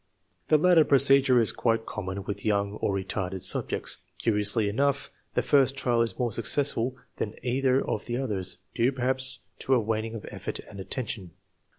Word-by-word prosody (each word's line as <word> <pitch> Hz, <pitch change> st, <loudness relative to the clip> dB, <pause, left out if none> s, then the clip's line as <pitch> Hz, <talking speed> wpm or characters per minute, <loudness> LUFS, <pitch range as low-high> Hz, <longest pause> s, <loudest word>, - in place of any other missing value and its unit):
The 155 Hz, -, +5 dB
latter 170 Hz, 0 st, +6 dB
procedure 135 Hz, -2 st, +5 dB
is 115 Hz, -, +3 dB
quite 115 Hz, -1 st, 0 dB
common 100 Hz, -1 st, -5 dB
with 100 Hz, +1 st, -5 dB
young 100 Hz, -2 st, +1 dB
or -, -, +1 dB
retarded 95 Hz, -1 st, -3 dB
subjects. 95 Hz, -, -1 dB, 0.2 s
Curiously 105 Hz, -1 st, +2 dB
enough, 140 Hz, +6 st, 0 dB, 0.2 s
the -, -, +2 dB
first 135 Hz, -1 st, +3 dB
trial 120 Hz, -3 st, +2 dB
is 115 Hz, -, -1 dB
more 120 Hz, -2 st, 0 dB
successful 125 Hz, +1 st, 0 dB, 0.2 s
than 105 Hz, -, -3 dB
either 130 Hz, +1 st, +1 dB
of 105 Hz, -, -3 dB
the 120 Hz, 0 st, -2 dB
others, 105 Hz, -8 st, -2 dB, 0.2 s
due 120 Hz, +2 st, +2 dB
perhaps 130 Hz, 0 st, -1 dB, 0.2 s
to 135 Hz, -, +2 dB
a -, -, +4 dB
waning 110 Hz, +1 st, -2 dB
of 110 Hz, -, -7 dB
effort -, -, -5 dB
and 100 Hz, -, -10 dB
attention. 100 Hz, -3 st, -4 dB
115 Hz, 170 wpm, -27 LUFS, 105-130 Hz, 0.2 s, latter